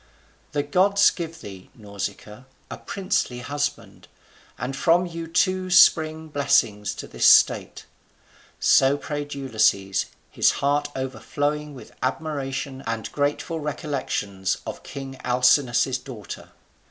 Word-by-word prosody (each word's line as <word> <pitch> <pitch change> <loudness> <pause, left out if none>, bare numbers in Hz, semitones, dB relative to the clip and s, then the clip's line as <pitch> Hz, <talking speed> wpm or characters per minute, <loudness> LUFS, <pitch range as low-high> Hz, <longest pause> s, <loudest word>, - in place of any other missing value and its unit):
The 145 -1 0
gods 195 +7 +4
give 165 -2 -7
thee, 95 -2 -11
Nausicaa, 105 +2 -7 0.3
a - - -5
princely 185 -10 -2
husband; 145 +2 -4 0.5
and 135 +2 -4
from 170 +5 +3
you 165 -1 -6
two 185 +2 +1
spring 160 -3 +4
blessings 140 -8 +1
to - - -8
this - - +2
state." - - +4 0.7
So 135 +2 +4
prayed 145 -1 -5
Ulysses, 110 -7 +1 0.2
his - - +3
heart 145 +1 0
overflowing 145 +3 -3
with 130 - -12
admiration 135 -1 -3
and 115 -1 -3
grateful 145 +3 -1
recollections 135 - -3
of - - -6
king 135 -1 -8
Alcinous's 125 0 +3
daughter. 120 -6 -9
140 Hz, 115 wpm, -24 LUFS, 125-155 Hz, 0.7 s, gods